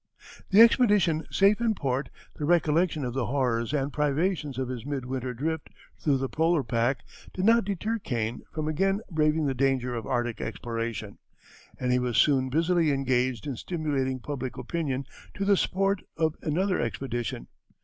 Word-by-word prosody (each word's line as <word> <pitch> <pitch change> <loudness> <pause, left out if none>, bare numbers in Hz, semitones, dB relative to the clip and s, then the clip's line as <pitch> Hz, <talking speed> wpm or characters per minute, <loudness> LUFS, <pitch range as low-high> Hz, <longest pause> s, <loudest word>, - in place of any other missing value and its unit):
The 200 +3 +7
expedition 205 -9 +4
safe 200 +3 +3
in 225 -2 +2
port, 135 -3 -2 0.3
the - - -5
recollection 160 -2 +2
of 120 - -3
the 130 -3 -1
horrors 125 -3 0
and 140 -1 -1
privations 150 -1 0
of 130 -1 -1
his 125 -2 -5
mid 140 -2 -4
winter 130 0 -3
drift 160 +4 -3 0.3
through 145 -3 +2
the 135 0 -2
polar 160 +1 +1
pack 120 +3 0 0.3
did 185 - -1
not 230 -1 +5
deter 210 +3 -2
Kane 115 - -3
from 155 -1 -3
again 195 +6 +1
braving 155 -1 +2
the 135 - +1
danger 130 -1 +1
of 115 -2 -4
Arctic 120 -2 -1
exploration, 115 -3 -4 0.6
and 125 -1 0
he 125 - +3
was 125 -2 -1
soon 130 -3 +4
busily 165 +3 +2
engaged 130 -4 0
in 140 -3 -3
stimulating 140 -4 -2
public 130 -1 -5
opinion 140 -6 -2 0.3
to 200 - -2
the 200 0 +5
support 195 +1 +1 0.2
of 160 -1 +1
another 180 +5 0
expedition. 120 - -3
145 Hz, 165 wpm, -27 LUFS, 125-170 Hz, 0.6 s, The